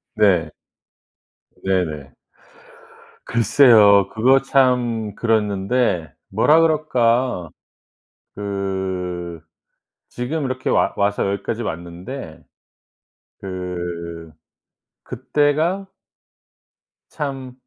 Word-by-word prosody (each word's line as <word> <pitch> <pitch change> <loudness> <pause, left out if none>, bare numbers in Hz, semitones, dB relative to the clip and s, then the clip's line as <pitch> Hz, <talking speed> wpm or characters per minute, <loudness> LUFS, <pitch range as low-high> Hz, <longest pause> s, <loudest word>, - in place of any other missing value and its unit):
네. 90 -7 +3 1.1
네네. 80 -8 -2 1.1
글쎄요. 110 -4 +5
그거 130 +6 +3
참 125 -6 +1
그랬는데 105 - 0 0.2
뭐라 150 +11 +4
그럴까. 125 - +1 0.9
그 95 -4 -4 0.7
지금 140 +5 -3
이렇게 130 -1 -3
와 - - +2
와서 100 -1 0
여기까지 110 +3 -3
왔는데 85 - -7 1.0
그 85 -3 -6 0.7
그때가 150 +9 0 1.2
참 135 -4 -5
105 Hz, 130 characters per minute, -20 LUFS, 90-130 Hz, 1.2 s, 글쎄요